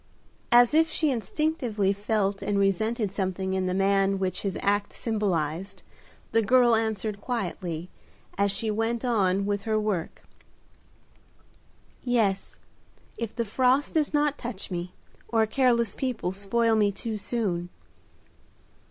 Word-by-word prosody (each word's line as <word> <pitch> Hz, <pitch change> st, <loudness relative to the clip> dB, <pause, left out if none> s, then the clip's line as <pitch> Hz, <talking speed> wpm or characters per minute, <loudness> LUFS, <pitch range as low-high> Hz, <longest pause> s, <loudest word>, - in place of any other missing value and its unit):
As 240 Hz, +2 st, +6 dB
if 320 Hz, +1 st, +4 dB
she 310 Hz, -2 st, +1 dB
instinctively 235 Hz, -, 0 dB
felt 200 Hz, -1 st, -1 dB
and 205 Hz, -, -1 dB
resented 205 Hz, +2 st, +1 dB
something 190 Hz, -1 st, -2 dB
in 190 Hz, -1 st, 0 dB
the 180 Hz, -, 0 dB
man 195 Hz, 0 st, +2 dB
which 190 Hz, -1 st, -2 dB
his 195 Hz, -2 st, -2 dB
act 205 Hz, 0 st, +1 dB
symbolized, 190 Hz, -4 st, -2 dB, 0.5 s
the 225 Hz, -, +3 dB
girl 240 Hz, +1 st, +5 dB
answered 220 Hz, -2 st, -2 dB
quietly, 180 Hz, -9 st, -3 dB, 0.5 s
as 200 Hz, 0 st, +2 dB
she 220 Hz, +2 st, -2 dB
went 225 Hz, +3 st, -1 dB
on 200 Hz, -5 st, +2 dB
with 205 Hz, 0 st, -1 dB
her 215 Hz, +1 st, 0 dB
work, 205 Hz, -6 st, -3 dB, 1.8 s
"Yes, 220 Hz, -6 st, 0 dB, 0.6 s
if 230 Hz, -2 st, -5 dB
the 235 Hz, -, -1 dB
frost 255 Hz, +6 st, +2 dB
does 310 Hz, -2 st, +1 dB
not 295 Hz, -1 st, +1 dB
touch 230 Hz, -6 st, -5 dB
me, 175 Hz, 0 st, -4 dB, 0.3 s
or 225 Hz, -1 st, +2 dB
careless 235 Hz, -2 st, +2 dB
people 250 Hz, -9 st, -2 dB
spoil 220 Hz, +4 st, +1 dB
me 210 Hz, -2 st, +3 dB
too 220 Hz, +3 st, -5 dB
soon." 200 Hz, -5 st, -2 dB
210 Hz, 130 wpm, -27 LUFS, 195-235 Hz, 1.8 s, As